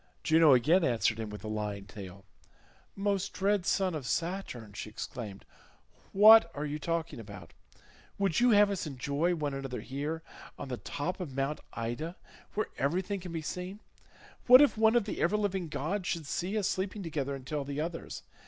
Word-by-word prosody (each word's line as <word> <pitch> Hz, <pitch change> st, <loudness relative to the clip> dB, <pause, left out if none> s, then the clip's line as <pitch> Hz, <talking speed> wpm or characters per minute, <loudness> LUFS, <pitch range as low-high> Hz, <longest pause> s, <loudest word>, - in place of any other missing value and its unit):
Juno 160 Hz, -3 st, +6 dB
again 160 Hz, +9 st, +4 dB
answered 115 Hz, -4 st, +1 dB
him 110 Hz, -1 st, -4 dB
with 105 Hz, -1 st, -8 dB
a -, -, -5 dB
lying 105 Hz, -2 st, -3 dB
tale. 100 Hz, -2 st, -10 dB, 0.7 s
"Most 200 Hz, 0 st, -1 dB
dread 200 Hz, -1 st, +1 dB
son 190 Hz, -2 st, +2 dB
of 145 Hz, -5 st, -4 dB
Saturn," 165 Hz, -, -3 dB
she 105 Hz, -, -6 dB
exclaimed, 105 Hz, -2 st, -7 dB, 0.7 s
"what 215 Hz, -2 st, +8 dB
are 145 Hz, +1 st, -3 dB
you 150 Hz, +1 st, -3 dB
talking 165 Hz, -3 st, -2 dB
about? 100 Hz, -6 st, -10 dB, 0.6 s
Would 195 Hz, -5 st, +1 dB
you 245 Hz, +1 st, +5 dB
have 205 Hz, -2 st, +6 dB
us 190 Hz, -5 st, -3 dB
enjoy 145 Hz, +5 st, 0 dB
one 145 Hz, -3 st, -2 dB
another 135 Hz, -2 st, -4 dB
here 150 Hz, +5 st, -4 dB, 0.3 s
on 140 Hz, -, -7 dB
the 125 Hz, -, -3 dB
top 165 Hz, +11 st, -4 dB
of 155 Hz, -8 st, -6 dB
Mount 140 Hz, +2 st, -1 dB
Ida, 120 Hz, +9 st, -4 dB, 0.4 s
where 215 Hz, -, -1 dB
everything 185 Hz, +8 st, 0 dB
can 180 Hz, -1 st, -8 dB
be 165 Hz, -1 st, -4 dB
seen? 180 Hz, +5 st, -5 dB, 0.7 s
What 250 Hz, +1 st, +10 dB
if 290 Hz, 0 st, +5 dB
one 220 Hz, +1 st, +4 dB
of 240 Hz, -, +3 dB
the 210 Hz, -, -4 dB
ever 195 Hz, +5 st, +2 dB
living 195 Hz, -4 st, -1 dB
gods 180 Hz, +6 st, -3 dB
should 165 Hz, -4 st, -2 dB
see 180 Hz, +8 st, -2 dB
us 200 Hz, -3 st, +1 dB
sleeping 195 Hz, +1 st, -2 dB
together, 140 Hz, -4 st, -2 dB
and 130 Hz, -2 st, -10 dB
tell 145 Hz, +1 st, -2 dB
the 140 Hz, +1 st, -4 dB
others? 165 Hz, +2 st, -5 dB
160 Hz, 180 wpm, -31 LUFS, 130-190 Hz, 0.7 s, What